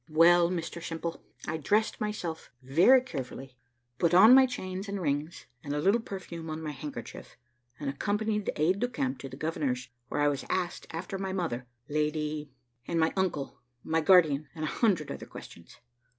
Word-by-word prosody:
"Well, 170 Hz, +2 st, +6 dB
Mr 170 Hz, -1 st, -4 dB
Simple, 165 Hz, 0 st, -4 dB, 0.3 s
I 160 Hz, -, -1 dB
dressed 210 Hz, +10 st, +1 dB
myself 195 Hz, -7 st, -4 dB
very 175 Hz, -, +6 dB
carefully, 135 Hz, -, -7 dB, 0.4 s
put 170 Hz, 0 st, +3 dB
on 215 Hz, +7 st, +9 dB
my 265 Hz, 0 st, +8 dB
chains 190 Hz, -5 st, -5 dB
and 200 Hz, 0 st, -3 dB
rings, 150 Hz, -2 st, -2 dB, 0.2 s
and 145 Hz, 0 st, -3 dB
a -, -, 0 dB
little 200 Hz, +9 st, +3 dB
perfume 170 Hz, -6 st, -7 dB
on 155 Hz, 0 st, -4 dB
my 155 Hz, -, -3 dB
handkerchief, 140 Hz, -4 st, -8 dB, 0.4 s
and 145 Hz, -, -4 dB
accompanied 210 Hz, +8 st, -1 dB
the -, -, -3 dB
aide 180 Hz, +6 st, +2 dB
de 245 Hz, -, +1 dB
camp 260 Hz, +1 st, -2 dB
to 135 Hz, -, -7 dB
the 130 Hz, -, -9 dB
governor's, 140 Hz, -6 st, -2 dB, 0.2 s
where 145 Hz, -, -2 dB
I 145 Hz, -, +4 dB
was 145 Hz, -2 st, 0 dB
asked 180 Hz, -2 st, -2 dB
after 180 Hz, +4 st, -5 dB
my 190 Hz, -1 st, -3 dB
mother, 130 Hz, -10 st, -2 dB, 0.2 s
Lady, 150 Hz, 0 st, -1 dB, 0.4 s
and 170 Hz, -, 0 dB
my 160 Hz, 0 st, +2 dB
uncle, 150 Hz, -8 st, -2 dB, 0.2 s
my 160 Hz, 0 st, +1 dB
guardian, 155 Hz, -4 st, +5 dB
and 155 Hz, -, -5 dB
a -, -, 0 dB
hundred 190 Hz, -10 st, +2 dB
other -, -, -7 dB
questions. 85 Hz, -, -12 dB
165 Hz, 180 wpm, -29 LUFS, 150-190 Hz, 0.4 s, on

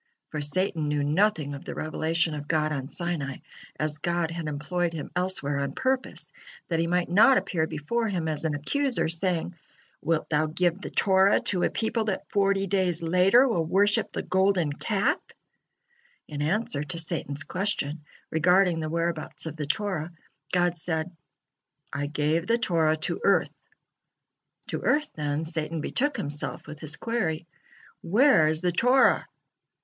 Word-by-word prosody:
For 150 Hz, -, -4 dB
Satan 160 Hz, +1 st, 0 dB
knew 145 Hz, -1 st, 0 dB
nothing 155 Hz, -1 st, +1 dB
of 140 Hz, -, -8 dB
the -, -, -6 dB
revelation 160 Hz, +1 st, 0 dB
of 145 Hz, -1 st, -6 dB
God 155 Hz, -1 st, +1 dB
on 135 Hz, -2 st, -3 dB
Sinai, 160 Hz, -7 st, -3 dB, 0.4 s
as 155 Hz, 0 st, -1 dB
God 170 Hz, -1 st, -1 dB
had 165 Hz, -1 st, -4 dB
employed 170 Hz, +4 st, -2 dB
him 155 Hz, -3 st, -6 dB
elsewhere 180 Hz, -6 st, 0 dB
on 140 Hz, -1 st, -2 dB
purposes, 260 Hz, -, -2 dB, 0.4 s
that 165 Hz, -2 st, 0 dB
he 165 Hz, -, +1 dB
might 180 Hz, +1 st, +1 dB
not 225 Hz, +9 st, +6 dB
appear 160 Hz, -3 st, 0 dB
before 225 Hz, +12 st, -2 dB
him 180 Hz, -6 st, -2 dB
as 155 Hz, -1 st, 0 dB
an 155 Hz, -2 st, 0 dB
accuser, 260 Hz, -, 0 dB
saying: 175 Hz, +1 st, -1 dB, 0.5 s
"Wilt 165 Hz, -1 st, 0 dB
Thou 155 Hz, +1 st, +2 dB
give 175 Hz, +3 st, 0 dB
the -, -, -5 dB
Torah 190 Hz, 0 st, +4 dB
to 185 Hz, -3 st, +2 dB
a -, -, +2 dB
people 225 Hz, 0 st, -1 dB
that 200 Hz, -3 st, -3 dB
forty 195 Hz, -1 st, +2 dB
days 185 Hz, -3 st, 0 dB
later 185 Hz, +10 st, +5 dB
will 210 Hz, -10 st, +1 dB
worship 205 Hz, +6 st, +3 dB
the -, -, -4 dB
Golden 185 Hz, -5 st, +2 dB
Calf?" 220 Hz, -, 0 dB, 1.1 s
In 145 Hz, -1 st, -5 dB
answer 160 Hz, -1 st, 0 dB
to 170 Hz, +3 st, -5 dB
Satan's 155 Hz, -4 st, -2 dB
question 160 Hz, -4 st, -2 dB, 0.3 s
regarding 180 Hz, +2 st, +3 dB
the 155 Hz, -1 st, -3 dB
whereabouts 165 Hz, -1 st, -1 dB
of 160 Hz, -1 st, -5 dB
the 150 Hz, -2 st, -4 dB
Torah, 180 Hz, -4 st, -2 dB, 0.4 s
God 175 Hz, -1 st, +1 dB
said: 160 Hz, +1 st, -2 dB, 0.8 s
"I 145 Hz, 0 st, -2 dB
gave 155 Hz, +3 st, 0 dB
the 230 Hz, +1 st, +3 dB
Torah 165 Hz, -8 st, +1 dB
to -, -, -3 dB
Earth." -, -, +3 dB, 1.2 s
To -, -, -3 dB
earth, 300 Hz, 0 st, +1 dB
then, 150 Hz, +1 st, -2 dB
Satan 160 Hz, 0 st, -3 dB
betook 285 Hz, -, -1 dB
himself 145 Hz, +1 st, -4 dB
with 155 Hz, -, -9 dB
his 150 Hz, -2 st, -4 dB
query: 220 Hz, -9 st, -2 dB, 0.6 s
"Where 210 Hz, -, +4 dB
is 155 Hz, +1 st, 0 dB
the 180 Hz, -, +1 dB
Torah?" 250 Hz, +9 st, +4 dB
170 Hz, 160 wpm, -26 LUFS, 155-195 Hz, 1.2 s, not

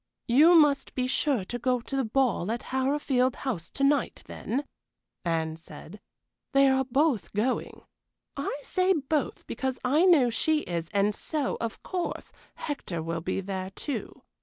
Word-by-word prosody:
"You 305 Hz, +9 st, +6 dB
must 295 Hz, -4 st, +4 dB
be 255 Hz, -, 0 dB
sure 255 Hz, -4 st, +1 dB
to 245 Hz, +5 st, -5 dB
go 250 Hz, +1 st, +1 dB
to 255 Hz, +3 st, -6 dB
the 270 Hz, -, +1 dB
ball 225 Hz, -5 st, +1 dB
at 235 Hz, -, -3 dB
Harrowfield 265 Hz, -1 st, +1 dB
House 205 Hz, -, -4 dB
to 275 Hz, -, -3 dB
night, 285 Hz, +1 st, +1 dB
then," 275 Hz, +5 st, -3 dB, 0.6 s
Anne 160 Hz, -2 st, -1 dB
said. 165 Hz, +4 st, -12 dB, 0.5 s
"They 275 Hz, 0 st, +6 dB
are 265 Hz, 0 st, +2 dB
both 260 Hz, -, +1 dB
going. 220 Hz, +5 st, -1 dB, 0.5 s
I 280 Hz, +1 st, -3 dB
say 370 Hz, 0 st, +2 dB
both 295 Hz, -3 st, -2 dB
because 260 Hz, +2 st, -3 dB
I 300 Hz, +8 st, +4 dB
know 290 Hz, -10 st, +5 dB
she 310 Hz, +6 st, +1 dB
is, 170 Hz, -, -4 dB
and 205 Hz, 0 st, +2 dB
so, 295 Hz, +4 st, -2 dB
of 230 Hz, -1 st, -4 dB
course, 360 Hz, -2 st, -4 dB, 0.2 s
Hector 180 Hz, -, -4 dB
will 165 Hz, 0 st, -3 dB
be 185 Hz, -, -2 dB
there 190 Hz, -1 st, -4 dB
too. 275 Hz, +8 st, -5 dB
255 Hz, 160 wpm, -28 LUFS, 200-285 Hz, 0.6 s, You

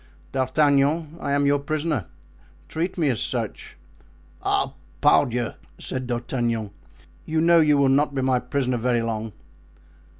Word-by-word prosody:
D'Artagnan, 145 Hz, -, +2 dB
I -, -, -3 dB
am 140 Hz, 0 st, +2 dB
your 140 Hz, 0 st, +3 dB
prisoner—treat 140 Hz, -, -5 dB
me 155 Hz, -5 st, +2 dB
as 120 Hz, -5 st, -1 dB
such." -, -, -4 dB, 0.6 s
"Ah! -, -, 0 dB, 0.3 s
pardieu!" 120 Hz, -1 st, +3 dB, 0.3 s
said 130 Hz, -1 st, -4 dB
D'Artagnan, 120 Hz, -3 st, -2 dB, 0.6 s
"you 160 Hz, 0 st, 0 dB
know 170 Hz, +1 st, +5 dB
you 150 Hz, -2 st, +4 dB
will 140 Hz, -1 st, +4 dB
not 140 Hz, +2 st, +2 dB
be 135 Hz, -, 0 dB
my 130 Hz, -1 st, +2 dB
prisoner 130 Hz, -2 st, -1 dB
very 120 Hz, 0 st, +1 dB
long." 110 Hz, -1 st, -3 dB
130 Hz, 130 wpm, -24 LUFS, 120-150 Hz, 0.6 s, know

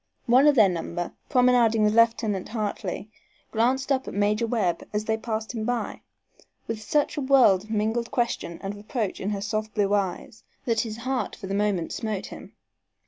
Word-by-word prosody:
One 260 Hz, +4 st, +5 dB
of 295 Hz, -, +5 dB
their 220 Hz, -5 st, +7 dB
number, 175 Hz, -1 st, -3 dB, 0.2 s
promenading 245 Hz, -3 st, +4 dB
with 210 Hz, 0 st, +3 dB
Lieutenant 225 Hz, -4 st, +2 dB
Hartley, 210 Hz, -2 st, -4 dB, 0.4 s
glanced 255 Hz, +5 st, +1 dB
up 265 Hz, -1 st, +1 dB
at -, -, -6 dB
Major 210 Hz, +3 st, +1 dB
Webb 195 Hz, -8 st, 0 dB
as 210 Hz, +1 st, -1 dB
they 220 Hz, -, +1 dB
passed 220 Hz, 0 st, -4 dB
him 225 Hz, -2 st, -3 dB
by, 245 Hz, +1 st, -2 dB, 0.6 s
with 220 Hz, -1 st, -4 dB
such 295 Hz, +8 st, 0 dB
a -, -, 0 dB
world 255 Hz, -8 st, +5 dB
of -, -, -18 dB
mingled 220 Hz, +2 st, 0 dB
question 235 Hz, -8 st, -2 dB
and 195 Hz, +1 st, -3 dB
reproach 210 Hz, 0 st, -3 dB
in 195 Hz, -, -2 dB
her 200 Hz, -1 st, -2 dB
soft 215 Hz, +1 st, -3 dB
blue 205 Hz, -1 st, +2 dB
eyes 200 Hz, +2 st, -2 dB, 0.2 s
that 230 Hz, -3 st, +1 dB
his 220 Hz, -2 st, -5 dB
heart 255 Hz, +2 st, -2 dB
for 210 Hz, -, -9 dB
the 195 Hz, -, -4 dB
moment 200 Hz, -4 st, 0 dB
smote 215 Hz, -4 st, -3 dB
him. -, -, -10 dB
220 Hz, 185 wpm, -25 LUFS, 205-240 Hz, 0.6 s, their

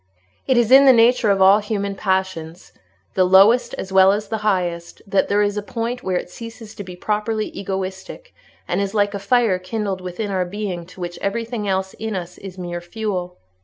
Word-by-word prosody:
It 260 Hz, -2 st, +3 dB
is 240 Hz, 0 st, +2 dB
in 270 Hz, +1 st, +8 dB
the 265 Hz, -, +8 dB
nature 235 Hz, -1 st, +4 dB
of 195 Hz, -1 st, +4 dB
all 195 Hz, +2 st, +7 dB
human 200 Hz, -2 st, -3 dB
passion, 190 Hz, -5 st, -2 dB, 0.6 s
the 185 Hz, -, +3 dB
lowest 195 Hz, +7 st, +5 dB
as 190 Hz, -, -7 dB
well 190 Hz, 0 st, +7 dB
as 210 Hz, +1 st, -2 dB
the 220 Hz, -, -2 dB
highest, 180 Hz, -5 st, -2 dB
that 200 Hz, -1 st, +1 dB
there 205 Hz, +1 st, +2 dB
is 205 Hz, 0 st, -1 dB
a -, -, -1 dB
point 230 Hz, +4 st, -4 dB
where 185 Hz, -4 st, -1 dB
it -, -, -4 dB
ceases 225 Hz, +2 st, -10 dB
to 205 Hz, -, -7 dB
be 180 Hz, -1 st, -9 dB
properly 215 Hz, +3 st, -2 dB
egoistic, 190 Hz, -, -6 dB, 0.3 s
and -, -, 0 dB
is 200 Hz, +1 st, -3 dB
like 205 Hz, -1 st, +2 dB
a 200 Hz, -, -3 dB
fire 205 Hz, -2 st, +2 dB
kindled 195 Hz, 0 st, -3 dB
within 185 Hz, +3 st, -4 dB
our 185 Hz, -1 st, 0 dB
being 180 Hz, -2 st, -5 dB
to 180 Hz, 0 st, -13 dB
which 175 Hz, 0 st, -5 dB
everything 225 Hz, +1 st, -3 dB
else 190 Hz, 0 st, -1 dB
in 220 Hz, -1 st, -3 dB
us 180 Hz, -1 st, -6 dB
is 190 Hz, -1 st, -9 dB
mere 175 Hz, -1 st, -5 dB
fuel. 180 Hz, -1 st, -4 dB
200 Hz, 200 wpm, -21 LUFS, 185-220 Hz, 0.6 s, in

